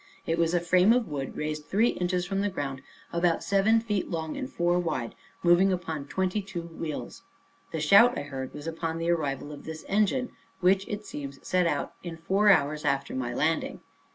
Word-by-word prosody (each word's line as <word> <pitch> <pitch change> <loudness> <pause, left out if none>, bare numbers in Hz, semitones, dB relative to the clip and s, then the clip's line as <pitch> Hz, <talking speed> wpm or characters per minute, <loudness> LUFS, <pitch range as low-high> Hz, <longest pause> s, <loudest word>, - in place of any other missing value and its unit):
It 165 +1 0
was 165 +1 +2
a - - +4
frame 180 +5 +4
of 245 -2 +1
wood 140 -3 -5
raised 150 0 -3
three 225 +5 +3
inches 180 0 -1
from 195 +1 -1
the 205 - +1
ground, 135 -7 -4 0.3
about 170 0 +1
seven 200 +3 +3
feet 210 -4 -2
long, 160 -3 -3
and 265 -1 -4
four 175 +1 +1
wide, 150 -9 -2 0.3
moving 175 +3 +5
upon 160 -5 -3
twenty 190 +4 -1
two 185 -3 -6
wheels. 165 -2 -6 0.5
The 160 - -3
shout 200 +11 +6
I - - -2
heard 135 -2 -6
was 145 0 -9
upon 165 0 -3
the 165 +1 0
arrival 145 -3 -2
of 145 - -9
this 160 0 -8
engine, 215 +5 +1 0.3
which, 190 +1 +3
it 210 0 -5
seems, 140 -1 -7
set 180 -1 +2
out 145 -3 -1
in 170 -2 -7
four 195 +5 +2
hours 150 -4 +3
after 140 -2 0
my 125 -2 -2
landing. 160 +4 0
170 Hz, 195 wpm, -28 LUFS, 150-195 Hz, 0.5 s, shout